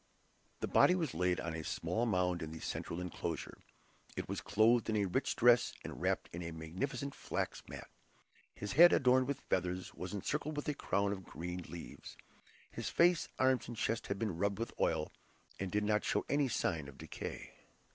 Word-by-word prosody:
The - - 0
body 180 - +5
was 165 -6 -1
laid 90 +1 +1
on 85 - -3
a 80 0 -4
small 115 +9 -1
mound 90 -4 +1
in 80 - -5
the 80 - -7
central 85 - -4
enclosure. 85 -2 -4 0.6
It - - -3
was - - -3
clothed 115 +3 +3
in 110 - +1
a 105 -1 +2
rich 115 +9 0
dress, 120 0 +5
and - - -7
wrapped - - 0
in 85 - -4
a 85 - -4
magnificent 95 - -4
flax - - -3
mat. - - -8 0.7
His 105 - -5
head, 175 +9 +8
adorned 130 0 +4
with 140 - -2
feathers, 90 0 -1
was 90 +2 -5
encircled 150 +9 -2
with 145 - -3
a 150 - +1
crown 100 -6 0
of 95 -2 -4
green 90 +1 -5
leaves. 85 -8 -9 0.5
His - - -4
face, 175 0 +4
arms, 130 -1 +3
and 120 - -7
chest 115 +2 -1
had 100 - -2
been 105 -5 -2
rubbed 100 0 +1
with 115 +1 -3
oil, - - +1 0.5
and 95 -2 -3
did 105 0 +1
not 105 0 +2
show - - 0
any 145 -1 +2
sign 85 - -1
of 70 - -11
decay. - - -7
100 Hz, 190 wpm, -35 LUFS, 90-125 Hz, 0.7 s, head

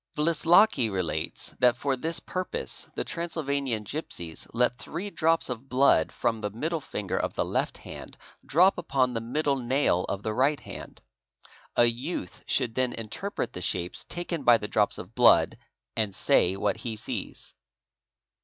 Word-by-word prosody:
Wlislocki 165 - +4
relates 85 -5 -3
that 125 -1 +5
for 135 +1 0
this 160 +6 -3
purpose 185 0 -4
the - - -1
Transylvanian 140 -9 -2
gipsies 95 - -6
let 120 +1 +1
three 190 +6 -5
drops 165 -1 +2
of 125 +1 -5
blood 130 +2 +4
from 115 -2 -1
the 105 - -1
middle 155 - -2
finger 100 -7 -4
of - - -2
the - - 0
left - - -1
hand - - -10 0.3
drop 180 +5 +4
upon 130 -6 +1
the 115 - -2
middle 140 +4 0
nail 125 -7 +1
of 100 +1 -4
the 110 - -1
right 135 +5 +2
hand. - - -10 0.7
A 120 - +6
youth 120 - -3
should 115 - +1
then 130 0 0
interpret 120 - -4
the 90 - -6
shapes 90 0 -2
taken 175 -2 -4
by 120 -3 +6
the 105 -1 -5
drops 105 -1 +1
of 90 +5 -9
blood 120 0 +5 0.4
and 105 -4 -1
say 95 +2 +3
what 100 -1 0
he 115 -2 -4
sees. 105 - -6
125 Hz, 160 wpm, -27 LUFS, 110-155 Hz, 0.7 s, A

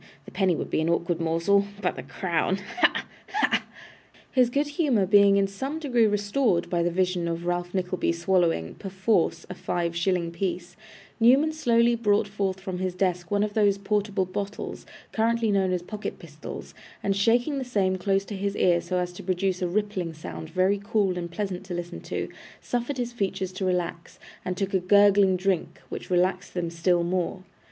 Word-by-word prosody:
The - - -11
penny 190 -4 +2
would - - -5
be - - +1
an 160 - 0
awkward 170 0 0
morsel 170 +5 +2
but - - -1
the - - -6
crown 180 0 -1 0.2
ha! - - +3 0.3
ha!' 420 - +2 0.7
His 250 -2 +4
good 285 +4 0
humour 285 - +2
being 200 0 +6
in 200 - +3
some 265 +10 -4
degree 245 -8 +2
restored 205 -2 +1
by 175 -1 +2
the 170 - +2
vision 180 -1 0
of 170 0 -3
Ralph 175 +1 -2
Nickleby 185 -2 0
swallowing, 170 - +1
perforce, 190 -3 0
a - - -6
five 170 -2 -2
shilling 170 -1 0
piece, 175 0 -3 0.4
Newman 265 +7 +5
slowly 235 -6 +3
brought 210 -3 +2
forth 195 -2 -2
from 190 -2 -5
his 185 -1 -2
desk 180 -2 -1
one 205 0 +2
of 210 -1 -2
those 205 -2 +3
portable 200 -1 0
bottles, 200 +3 -5 0.2
currently 230 0 +1
known 190 -2 +2
as 180 -1 -1
pocket 210 +3 -5
pistols, - - -9 0.3
and 195 0 +1
shaking 240 +8 +2
the - - -2
same 195 -7 0
close 195 +1 +1
to 205 - -6
his 200 +1 -2
ear 175 -1 +3
so 185 - -2
as 180 0 -2
to 180 - -9
produce 185 0 -1
a 180 - +1
rippling 185 -3 -2
sound 155 0 -7
very 190 +4 +1
cool 205 -3 +1
and 175 -1 -4
pleasant 185 +1 -4
to 180 -2 -5
listen 175 0 -5
to, - - -3 0.3
suffered 245 +3 -2
his 240 -1 -3
features 195 -4 -2
to 190 +1 -3
relax, 175 -2 -2 0.3
and 185 -1 -3
took 195 +1 -2
a 190 - +3
gurgling 200 0 +5
drink, 185 -2 -1
which - - -6
relaxed 185 +1 +1
them 170 -2 -2
still 170 +1 +2
more. 180 +1 -2
190 Hz, 185 wpm, -26 LUFS, 175-205 Hz, 0.7 s, being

